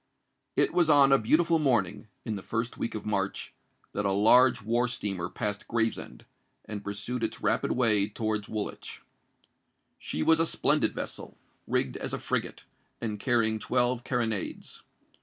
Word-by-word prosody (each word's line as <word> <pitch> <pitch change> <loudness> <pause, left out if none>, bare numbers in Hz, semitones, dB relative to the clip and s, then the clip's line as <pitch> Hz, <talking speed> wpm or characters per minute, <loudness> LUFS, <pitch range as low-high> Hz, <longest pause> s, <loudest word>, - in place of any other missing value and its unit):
It - - +2
was 175 -2 +3
on 140 -2 +6
a 135 - +6
beautiful 165 +8 +3
morning, 120 - +1 0.2
in 110 -3 -2
the 100 - -5
first 115 +4 -3
week 115 - -3
of 110 - -5
March, 100 -2 -2 0.4
that 105 - -1
a 100 - +1
large 115 +4 +5
war 120 +3 +1
steamer 100 -7 -3
passed 105 -3 -4
Gravesend, 115 -1 -2 0.4
and 105 -1 -6
pursued 105 +5 -4
its - - -3
rapid - - +1
way 110 -5 +3
towards 110 -1 -2
Woolwich. 110 -2 -5 1.0
She 80 - -3
was 160 0 +4
a 165 - +4
splendid - - +1
vessel, - - -7 0.3
rigged - - 0
as - - -5
a - - -3
frigate, - - -3 0.4
and 105 -3 -3
carrying 110 -2 +1
twelve 125 +1 0
carronades. 115 -6 -3
115 Hz, 155 wpm, -28 LUFS, 105-125 Hz, 1.0 s, on